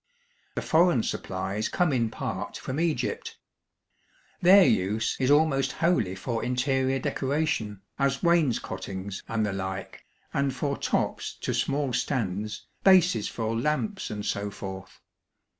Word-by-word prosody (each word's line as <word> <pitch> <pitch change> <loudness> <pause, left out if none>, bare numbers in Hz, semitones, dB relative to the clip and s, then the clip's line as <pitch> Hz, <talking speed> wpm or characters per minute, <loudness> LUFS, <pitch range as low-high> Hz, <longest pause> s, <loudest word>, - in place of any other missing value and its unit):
The - - -2
foreign 160 -7 +4
supplies 95 +3 -3
come 175 -5 +1
in 115 -3 +1
part - - -4
from 135 +3 -4
Egypt. 170 - -1 1.0
Their 190 +2 +8
use 105 +1 +1
is 130 0 +2
almost 145 -2 +3
wholly 115 - +1
for 115 +4 -3
interior 130 +1 +1
decoration, 130 -7 -1 0.2
as 135 -1 +1
wainscotings, 115 - 0
and 110 -1 0
the 105 - -2
like, 95 0 -5 0.3
and 140 -1 0
for 140 +1 -1
tops - - -1
to - - -1
small 140 -2 0
stands, 105 -5 -2 0.2
bases 180 - +5
for 115 -1 -2
lamps, 150 - -1
and 105 -1 -5
so 100 +1 -1
forth. 95 -3 -8
130 Hz, 125 wpm, -27 LUFS, 105-150 Hz, 1.0 s, Their